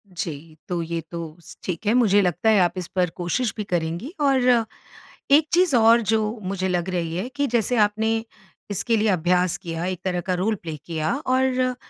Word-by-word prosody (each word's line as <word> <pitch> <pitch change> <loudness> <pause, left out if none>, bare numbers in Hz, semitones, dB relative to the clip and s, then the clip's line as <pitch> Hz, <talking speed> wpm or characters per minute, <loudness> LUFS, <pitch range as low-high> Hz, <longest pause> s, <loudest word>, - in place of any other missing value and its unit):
जी, 160 -3 -6
तो 175 -2 -2
ये 165 0 -3
तो 165 -2 -6
स - - -13
ठीक 180 +2 -4
है 210 - +3
मुझे 210 -5 +4
लगता 180 +4 +1
है 215 -2 +5
आप 175 -2 +3
इस 180 -2 -4
पर 180 -2 +2
कोशिश 200 +6 -1
भी 210 - -2
करेंगी 175 - -3
और 270 -3 +3 0.9
एक 300 +2 +6
चीज़ 350 -5 +4
और 230 0 +6
जो 220 0 0
मुझे 190 0 -2
लग 180 0 -1
रही 170 -3 -2
है 190 +7 -2
कि 285 0 0
जैसे 240 0 +1
आपने 215 +1 +2 0.6
इसके 225 +4 +1
लिए 215 +1 +1
अभ्यास 180 -1 +1
किया, 170 -2 -5
एक 185 -1 -3
तरह 180 -2 -1
का 185 - +1
रोल 195 +5 0
प्ले 165 -5 -7
किया, 160 -2 -1
और 255 -1 +1
190 Hz, 195 wpm, -23 LUFS, 175-230 Hz, 0.9 s, एक